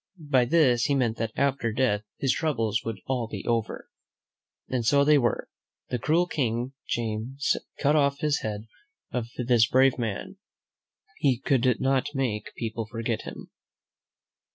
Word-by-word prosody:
By 145 Hz, -6 st, +2 dB
this 125 Hz, -4 st, +3 dB
he 145 Hz, -, +2 dB
meant 120 Hz, -4 st, +1 dB
that 115 Hz, -1 st, -2 dB
after 140 Hz, -4 st, +1 dB
death 110 Hz, -3 st, +1 dB, 0.2 s
his 135 Hz, -, +1 dB
troubles 115 Hz, -9 st, 0 dB
would 115 Hz, -3 st, -4 dB
all 125 Hz, -3 st, -1 dB
be 105 Hz, -3 st, -7 dB
over. 115 Hz, -2 st, -1 dB, 0.8 s
And 125 Hz, -2 st, -1 dB
so 140 Hz, +5 st, +4 dB
they 150 Hz, 0 st, +5 dB
were. 120 Hz, -2 st, 0 dB, 0.4 s
Though 125 Hz, -, +1 dB
the -, -, -13 dB
cruel 165 Hz, +6 st, +3 dB
King 125 Hz, -5 st, -2 dB
James 120 Hz, +4 st, -1 dB, 0.2 s
cut 150 Hz, +1 st, +3 dB
off 140 Hz, -2 st, +3 dB
the 150 Hz, -1 st, +1 dB
head 105 Hz, 0 st, -4 dB, 0.5 s
of 120 Hz, -2 st, -2 dB
this 120 Hz, -2 st, +3 dB
brave 130 Hz, 0 st, +4 dB
man, 110 Hz, -5 st, -4 dB, 0.8 s
he 135 Hz, -4 st, +3 dB
could 130 Hz, -2 st, +2 dB
not 135 Hz, +2 st, 0 dB
make 115 Hz, -6 st, -2 dB
people 115 Hz, -1 st, -4 dB
forget 115 Hz, 0 st, -3 dB
him. -, -, -9 dB
125 Hz, 155 wpm, -27 LUFS, 115-140 Hz, 0.8 s, they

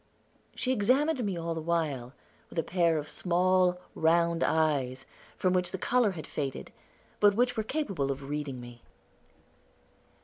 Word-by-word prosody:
She 255 Hz, -, -1 dB
examined 260 Hz, +5 st, +2 dB
me 195 Hz, -4 st, -2 dB
all 165 Hz, 0 st, -2 dB
the 165 Hz, -, -4 dB
while, 155 Hz, -7 st, -1 dB, 0.4 s
with -, -, -12 dB
a 165 Hz, -, +2 dB
pair 170 Hz, -2 st, +2 dB
of 150 Hz, 0 st, -4 dB
small, 180 Hz, +1 st, +2 dB
round 170 Hz, +1 st, +2 dB
eyes, 140 Hz, -5 st, +1 dB, 0.3 s
from 185 Hz, -1 st, +1 dB
which 180 Hz, -1 st, +1 dB
the -, -, -4 dB
color 235 Hz, 0 st, +2 dB
had 160 Hz, -3 st, -7 dB
faded, 140 Hz, -3 st, -4 dB, 0.5 s
but 205 Hz, -1 st, +5 dB
which 245 Hz, +2 st, +2 dB
were 220 Hz, -, 0 dB
capable 205 Hz, -, -2 dB
of 135 Hz, 0 st, -6 dB
reading 145 Hz, -3 st, -4 dB
me. 120 Hz, -1 st, -11 dB
170 Hz, 150 wpm, -29 LUFS, 150-195 Hz, 0.5 s, but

